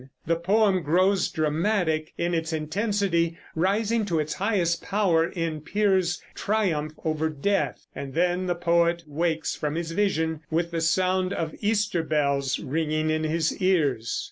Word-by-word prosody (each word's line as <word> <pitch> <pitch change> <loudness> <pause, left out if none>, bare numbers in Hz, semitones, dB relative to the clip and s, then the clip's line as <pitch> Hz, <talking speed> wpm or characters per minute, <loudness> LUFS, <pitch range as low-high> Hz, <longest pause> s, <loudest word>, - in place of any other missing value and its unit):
The 165 - +2
poem 190 +2 +2
grows 185 +4 +2
dramatic 160 0 0
in 170 +1 -1
its 165 -1 -1
intensity, 170 +1 0 0.2
rising 210 +6 +1
to 175 -5 -1
its 155 0 -1
highest 190 -4 0
power 185 -5 +2
in 165 -3 -3
Piers's 190 -2 +1
triumph 175 -8 0
over 160 0 0
Death. 150 -1 -1
And 135 -1 -7
then 180 +2 +1
the 175 - 0
poet 170 0 +2
wakes 160 +2 -1
from 150 0 -3
his 165 0 -3
vision 160 -4 0
with 170 +1 0
the 165 -1 -2
sound 185 +3 +1
of 160 -1 -3
Easter 210 -4 +1
bells 140 -3 0
ringing 155 +2 -1
in 155 0 0
his 160 0 0
ears. 145 -11 +1
170 Hz, 145 wpm, -26 LUFS, 155-190 Hz, 0.2 s, The